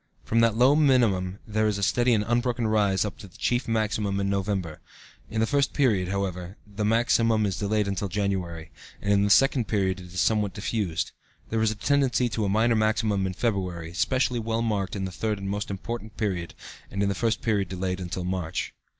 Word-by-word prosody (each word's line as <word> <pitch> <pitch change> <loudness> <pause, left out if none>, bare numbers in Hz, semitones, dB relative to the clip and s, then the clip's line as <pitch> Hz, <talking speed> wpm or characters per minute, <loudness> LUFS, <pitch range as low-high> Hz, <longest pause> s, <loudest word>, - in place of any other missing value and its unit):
From 115 - +1
that 115 -2 +4
low 125 +5 +5
minimum 115 -11 +3
there 110 0 0
is 100 -2 0
steady 120 +4 +2
and 105 -1 0
unbroken 120 0 0
rise 105 -3 +2
up 105 - -6
to 100 - -10
the 90 - -18
chief 120 +1 0
maximum 105 -3 0
in 100 0 0
November. 95 -5 -2 0.5
(In 110 0 -1
the - - +4
first 140 +3 +1
period, 110 -10 +2
however, 95 -1 -3
the 105 0 -5
maximum 115 0 +3
is 95 -2 -2
delayed 105 0 +1
till 100 - -2
January, 90 -5 -3 0.3
and 100 0 +1
in 100 0 +3
the 100 - +1
second 130 0 +4
period 95 -3 0
it 90 - -10
is 90 - -4
somewhat 105 0 +1
diffused.) 105 -5 -2 0.4
There 110 0 +1
is 110 - +3
a 110 - -3
tendency 130 +1 +1
to 110 -2 -1
a - - 0
minor 115 +3 +3
maximum 110 -2 +1
in 95 - -3
February, 90 -7 -2
specially 125 +4 +1
well 115 0 -1
marked 105 -4 -1
in 95 -1 -2
the 95 - -5
third 105 +2 -2
and 100 0 -6
most 105 +1 -3
important 110 +2 -6
period, 95 -6 -2 0.3
and 100 0 -2
in - - +2
the - - +1
first 115 +2 -1
period 100 -5 +1
delayed 90 0 -3
until 90 0 -4
March. 90 -2 -3
105 Hz, 205 wpm, -26 LUFS, 95-115 Hz, 0.5 s, low